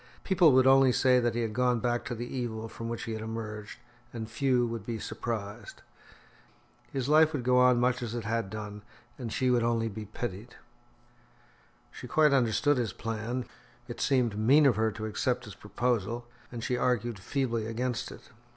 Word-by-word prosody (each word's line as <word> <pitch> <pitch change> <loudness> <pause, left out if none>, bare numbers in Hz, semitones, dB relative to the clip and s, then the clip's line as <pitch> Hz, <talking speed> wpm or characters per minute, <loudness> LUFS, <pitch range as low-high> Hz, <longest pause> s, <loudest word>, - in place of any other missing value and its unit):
People 180 -5 +5
would 130 0 +5
only 135 -1 +6
say 125 0 +4
that 120 -2 0
he 120 - 0
had 110 -2 -3
gone 125 0 +2
back 120 0 -1
to 120 - -4
the 120 +2 -5
evil 115 -3 -4
from 115 +1 -7
which 115 - -4
he 115 - -5
had 110 - -5
emerged, 110 -1 -6 0.3
and 115 -2 -5
few 125 +1 +2
would 115 -3 -4
be 115 +1 -4
surprised. 110 -1 -6 1.1
His 135 -2 -2
life 155 +1 +5
would 140 -5 -2
go 125 +1 +4
on 125 -1 +5
much 125 +1 +1
as 120 -1 -4
it 120 - -3
had 115 -1 -2
done, 105 0 -7 0.4
and 120 -3 -5
she 130 +2 +1
would 120 -1 +3
only 115 -1 +1
be 110 +1 -7
pitied. 110 +1 -6 1.4
She - - -9
quite 150 -2 +4
understood 135 +3 +2
his 115 -6 -1
plan; 115 +3 -4 0.4
it 120 - -7
seemed 120 -7 +1
mean 140 +7 +5
of 130 -5 +5
her 110 +1 +1
to 110 +1 -6
accept 120 +3 -1
his 105 - -9
proposal, 115 +2 -2 0.3
and 120 -2 -6
she 125 - 0
argued 120 -3 0
feebly 115 +1 -2
against 120 +2 -3
it. - - -13
120 Hz, 190 wpm, -29 LUFS, 110-125 Hz, 1.4 s, only